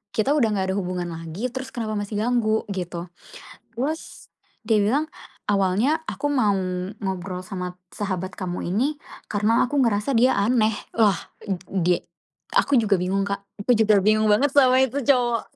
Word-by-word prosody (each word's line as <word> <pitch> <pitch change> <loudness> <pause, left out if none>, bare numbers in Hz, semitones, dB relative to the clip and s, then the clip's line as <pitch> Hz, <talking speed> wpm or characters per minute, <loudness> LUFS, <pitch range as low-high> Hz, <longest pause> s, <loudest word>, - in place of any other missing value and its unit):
kita 220 +6 +2
udah 230 -8 +2
gak 190 -1 0
ada - - -2
hubungan 180 -2 -3
lagi, 165 +9 -5
terus 260 +2 -5
kenapa 215 -3 -2
masih 205 +1 -5
ganggu, 225 -3 +1
gitu. 175 -2 -5 0.6
Terus 285 +8 -5 0.4
dia 220 - +4
bilang, 285 +9 +1 0.4
"Awalnya 210 - +2
aku 290 - -3
mau 250 -8 +2 0.5
ngobrol 185 -1 -4
sama 180 -1 -6
sahabat 185 -2 -4
kamu 180 -2 -4
ini 275 +10 0 0.3
karena 210 +3 +3
aku 280 +3 0
ngerasa 225 0 +1
dia 250 +1 +4
aneh," 220 0 +2 0.2
lah 210 -5 +3 0.2
ed 195 - -3 0.2
dia 175 +1 +2 0.5
aku 280 - +3
juga 205 -6 +3
bingung 195 +2 0
Kak, 200 0 -3 0.2
aku 250 - +4
juga 215 -2 +4
bingung 215 +1 +3
banget 260 +7 +3
sama 260 -3 +5
itu 265 +3 -2
cowok. 240 -3 +2
215 Hz, 160 wpm, -23 LUFS, 190-250 Hz, 0.6 s, sama